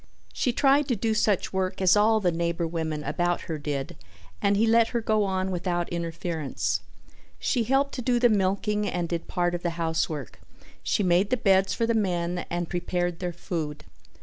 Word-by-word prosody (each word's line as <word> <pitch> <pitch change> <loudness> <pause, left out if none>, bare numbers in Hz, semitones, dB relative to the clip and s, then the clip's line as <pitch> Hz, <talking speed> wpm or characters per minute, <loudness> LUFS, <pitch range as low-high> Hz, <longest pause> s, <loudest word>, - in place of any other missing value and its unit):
She 250 - 0
tried 275 +3 +3
to 245 - +1
do 220 +2 0
such 215 -4 +1
work 190 0 -1
as 190 0 +5
all 220 +1 +4
the 180 -4 +1
neighbor 170 0 -1
women 160 -2 -3
about 175 +5 0
her 160 -3 -5
did 145 -2 -4 0.5
and 200 0 +3
he 220 - +3
let 230 0 +4
her 235 - -1
go 215 -2 +1
on 190 0 -1
without 175 -1 -1
interference. 165 -3 -2 0.6
She 240 -4 0
helped 270 +3 +1
to 255 - -4
do 245 0 +2
the 240 0 +5
milking 210 0 +1
and 175 -1 -2
did 170 0 -4
part 175 -1 0
of 175 - -3
the 170 -1 -3
housework; 160 -5 -2 0.4
she 205 - 0
made 180 +2 +3
the 255 - +2
beds 195 -3 +3
for 230 - +1
the 230 - +1
men 180 -4 -1
and 175 0 -2
prepared 175 -1 -2
their 180 -1 -2
food. 160 -3 -5
180 Hz, 190 wpm, -26 LUFS, 170-215 Hz, 0.6 s, as